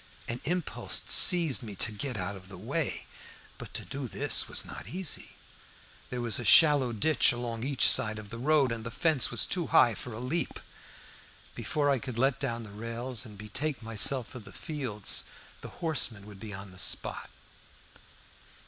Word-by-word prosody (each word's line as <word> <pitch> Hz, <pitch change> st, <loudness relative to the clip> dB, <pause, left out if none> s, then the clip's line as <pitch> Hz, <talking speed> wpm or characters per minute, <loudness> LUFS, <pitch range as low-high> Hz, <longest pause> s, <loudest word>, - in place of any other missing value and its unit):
An 120 Hz, +1 st, -3 dB
impulse 175 Hz, +1 st, -1 dB
seized 165 Hz, -7 st, +4 dB
me 105 Hz, -4 st, -7 dB
to 110 Hz, -, -1 dB
get 125 Hz, +3 st, -4 dB
out 95 Hz, +2 st, -3 dB
of 95 Hz, 0 st, -13 dB
the 95 Hz, -, -10 dB
way. 135 Hz, -, -3 dB, 0.5 s
But -, -, -9 dB
to -, -, -4 dB
do 135 Hz, -1 st, -5 dB
this -, -, +1 dB
was -, -, +2 dB
not -, -, -8 dB
easy. 180 Hz, -1 st, -3 dB, 0.8 s
There 125 Hz, -1 st, -4 dB
was 115 Hz, -3 st, +1 dB
a -, -, -4 dB
shallow 145 Hz, +1 st, +6 dB
ditch 135 Hz, +8 st, +3 dB
along 120 Hz, -1 st, -4 dB
each 135 Hz, -3 st, +4 dB
side 110 Hz, 0 st, +3 dB
of 105 Hz, -1 st, -9 dB
the 115 Hz, -, -7 dB
road, 140 Hz, -1 st, +3 dB
and 115 Hz, -1 st, -4 dB
the 115 Hz, -, -5 dB
fence 155 Hz, +1 st, +2 dB
was 120 Hz, -, +1 dB
too 175 Hz, -4 st, -1 dB
high 120 Hz, -, +5 dB
for 125 Hz, -, -8 dB
a 110 Hz, -, -7 dB
leap. 130 Hz, +8 st, -3 dB, 0.9 s
Before 145 Hz, -1 st, -1 dB
I 135 Hz, -, +1 dB
could 125 Hz, -2 st, -7 dB
let 135 Hz, +2 st, +2 dB
down 120 Hz, -4 st, -3 dB
the 105 Hz, -, -11 dB
rails 115 Hz, +3 st, -5 dB
and 105 Hz, -2 st, -12 dB
betake 130 Hz, +7 st, -3 dB
myself 115 Hz, +2 st, +4 dB
to 125 Hz, -, -8 dB
the 105 Hz, -, -13 dB
fields 125 Hz, -10 st, -1 dB, 0.4 s
the -, -, -8 dB
horseman 135 Hz, -, -1 dB
would 105 Hz, -2 st, -12 dB
be 105 Hz, +1 st, -8 dB
on 100 Hz, 0 st, -8 dB
the 90 Hz, -, -10 dB
spot. -, -, -1 dB
120 Hz, 185 wpm, -29 LUFS, 110-140 Hz, 0.9 s, shallow